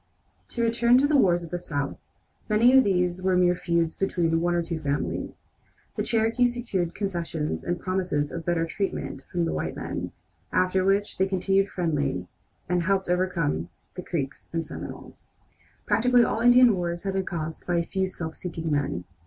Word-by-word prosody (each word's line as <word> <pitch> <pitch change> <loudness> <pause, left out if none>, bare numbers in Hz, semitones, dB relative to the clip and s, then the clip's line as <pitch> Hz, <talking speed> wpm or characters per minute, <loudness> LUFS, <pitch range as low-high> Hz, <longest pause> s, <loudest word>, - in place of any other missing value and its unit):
To 235 - -3
return 235 +1 +4
to 270 - +4
the 295 +1 +2
wars 175 -9 +4
in 165 - -8
the 175 - -3
South, 145 -5 -3 0.5
many 230 +5 +5
of 265 - +8
these 180 -2 +1
were 185 -1 +2
mere 180 -1 +4
feuds 170 -2 0
between 165 -4 0
one 175 0 +1
or 170 - +1
two 165 -1 -4
families. 145 -2 -3 0.5
The - - -1
Cherokees 235 +1 +1
secured 190 -8 -2
concessions 170 -6 -3
and 175 0 -2
promises 180 -6 -1
of 165 - -5
better 170 -1 0
treatment 195 +4 -3
from 175 -2 0
the - - -2
white - - -3
men, - - -4 0.4
after 185 0 +2
which 195 +1 +1
they 190 - +3
continued 195 +1 +1
friendly, 145 - -1 0.4
and 180 0 +1
helped 190 +1 0
in - - +4
overcoming 85 - -1 0.2
the 180 - -6
Creeks 145 -6 -4
and 165 -1 -2
Seminoles. - - -9 0.5
Practically 245 +1 +4
all 225 - 0
Indian 245 -2 +7
wars 170 -1 -3
have 195 -1 -2
been 190 0 0
caused 160 -3 -5
by 175 - +1
a 170 0 +1
few 190 +2 -1
self 160 -3 -6
seeking 165 -3 -4
men. 140 -12 -1
180 Hz, 180 wpm, -26 LUFS, 165-195 Hz, 0.5 s, of